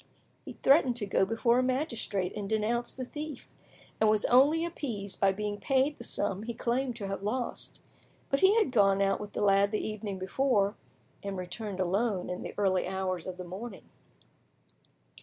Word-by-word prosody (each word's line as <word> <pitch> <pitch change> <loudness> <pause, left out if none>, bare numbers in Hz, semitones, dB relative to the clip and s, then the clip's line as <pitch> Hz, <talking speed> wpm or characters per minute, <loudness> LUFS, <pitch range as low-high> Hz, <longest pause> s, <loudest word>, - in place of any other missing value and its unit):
He - - -7
threatened 270 -3 +5
to 225 -4 0
go 195 -1 +2
before 235 +4 +2
a - - +2
magistrate 235 - -1
and 205 -2 -4
denounce 225 +2 0
the 255 - -4
thief, 295 0 -7 0.5
and 220 - +4
was 215 -1 +2
only 290 +7 +5
appeased 230 - -4
by 195 -1 +4
being 205 +1 -3
paid 270 +1 +1
the - - -7
sum 200 -4 -1
he 230 +1 -5
claimed 245 +2 -1
to 215 -3 -5
have 195 0 -4
lost. 240 +5 -3 0.5
But 275 - +3
he 385 +2 +5
had 430 - +3
gone 195 -5 +4
out 195 0 +2
with 210 -1 -8
the - - -3
lad 200 0 +4
the 215 - -2
evening 210 -2 -4
before, 200 +1 +1 0.5
and 200 -2 -4
returned 185 +2 -5
alone 190 +1 0
in 180 - -4
the - - -7
early 190 -3 +2
hours 185 -2 -2
of 185 -1 -5
the 180 - -6
morning. 190 +4 -8
210 Hz, 180 wpm, -30 LUFS, 195-250 Hz, 0.5 s, threatened